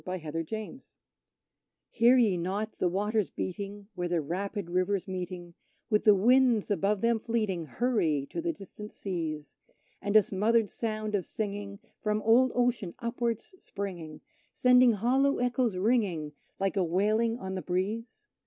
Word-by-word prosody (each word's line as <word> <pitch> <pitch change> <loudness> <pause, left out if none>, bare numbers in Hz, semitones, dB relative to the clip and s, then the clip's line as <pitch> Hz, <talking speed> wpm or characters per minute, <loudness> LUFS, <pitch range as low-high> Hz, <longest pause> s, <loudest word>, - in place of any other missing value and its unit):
The - - -8
Opossum 155 -4 -7 0.2
Hunters 220 +4 -7 0.9
Hear 240 +3 +5
ye 220 -7 +4
not 195 +5 -3
the 180 - +2
waters 210 +2 0
beating 200 +2 -5
where 175 -2 -3
the 175 -1 0
rapid 190 +5 -3
rivers, 185 +2 0
meeting 180 -2 -6 0.4
With 210 - +2
the 210 -2 +8
winds 240 +1 +4
above 200 0 +1
them 230 -1 +2
fleeting, 210 -8 -2
hurry 165 - 0
to 335 - -3
the 340 0 0
distant 210 - -10
seas, 160 -6 -5 0.4
And 205 +1 -2
a 215 - +8
smothered 215 +3 +1
sound 215 -2 -3
of 195 -5 -1
singing 200 -1 -4 0.2
from 210 0 0
old 240 +3 +5
Ocean 240 -7 0
upwards 235 - -3
springing, 175 -6 -6 0.3
Sending 250 -1 +5
hollow 260 +7 +2
echoes 245 -4 0
ringing 185 -8 0 0.3
like 195 +1 0
a 195 - +2
wailing 215 +7 +1
on 190 -4 -5
the 185 - -3
breeze? 220 - -3
205 Hz, 150 wpm, -29 LUFS, 185-230 Hz, 0.9 s, the